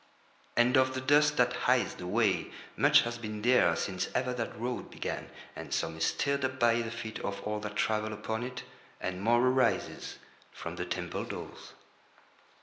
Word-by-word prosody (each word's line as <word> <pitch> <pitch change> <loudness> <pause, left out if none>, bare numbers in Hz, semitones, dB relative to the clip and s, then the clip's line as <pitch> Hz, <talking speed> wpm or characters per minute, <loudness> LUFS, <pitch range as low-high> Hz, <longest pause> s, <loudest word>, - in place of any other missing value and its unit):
And 120 +3 +5
of 130 0 +3
the - - -1
dust 150 +2 +4
that 125 0 +3 0.2
hides 125 -1 +3
the 90 - -7
way 100 -4 +1 0.3
much - - +6
has 120 0 -4
been 105 -2 -5
there 120 -9 +5
since 95 +1 -2
ever 125 0 +1
that 115 -4 -4
road 125 +1 -3
began, - - -5 0.3
and - - -8
some 80 - -1
is 80 - 0
stirred 140 -1 0
up 130 0 -2
by 120 -1 +4
the 115 - -3
feet 115 -1 -6
of 100 0 -4
all 105 0 -2
that 105 0 -6
travel 110 0 0
upon 110 +2 -3
it, 125 +1 -5 0.4
and 90 0 -4
more 120 +3 +4
arises 130 -2 0 0.3
from - - -7
the - - -2
temple - - -3
doors. - - -8
120 Hz, 180 wpm, -30 LUFS, 105-125 Hz, 0.4 s, much